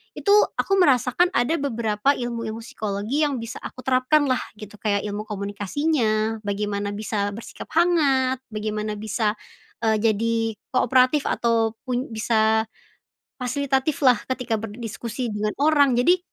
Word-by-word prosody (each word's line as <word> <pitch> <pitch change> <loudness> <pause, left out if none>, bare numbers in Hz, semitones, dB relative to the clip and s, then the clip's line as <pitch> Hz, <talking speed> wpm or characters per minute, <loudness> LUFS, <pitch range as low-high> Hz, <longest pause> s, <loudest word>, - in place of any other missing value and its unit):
itu 400 - 0 0.3
aku 390 0 +2
merasakan 275 +1 +4
ada 245 +7 +2
beberapa 235 -1 0
ilmu-ilmu 230 -2 -4
psikologi 215 +7 -2
yang 285 - -2
bisa 230 +1 -7
aku 255 - -8
terapkan 260 +4 +3
lah 255 - +2 0.2
gitu, 210 -1 -10
kayak 200 -2 0
ilmu 210 +1 -5
komunikasinya, 215 - -1
bagaimana 205 0 -2
bisa 205 -1 -2
bersikap 225 - -9
hangat, 280 -7 +3
bagaimana 215 0 -3
bisa, 215 0 -1 0.5
eee, 220 -1 +3
jadi 225 +1 +1 0.4
kooperatif 255 +3 +3
atau 230 -1 +1
pun 250 +1 -1
bisa, 220 0 +2 0.8
fasilitatif 270 +3 -1
lah 250 -3 +6
ketika 250 -3 -1
berdiskusi 230 +2 -5
dengan 210 0 -1
orang 290 -4 +4
jadi, 350 +9 +4
230 Hz, 130 wpm, -23 LUFS, 215-265 Hz, 0.8 s, lah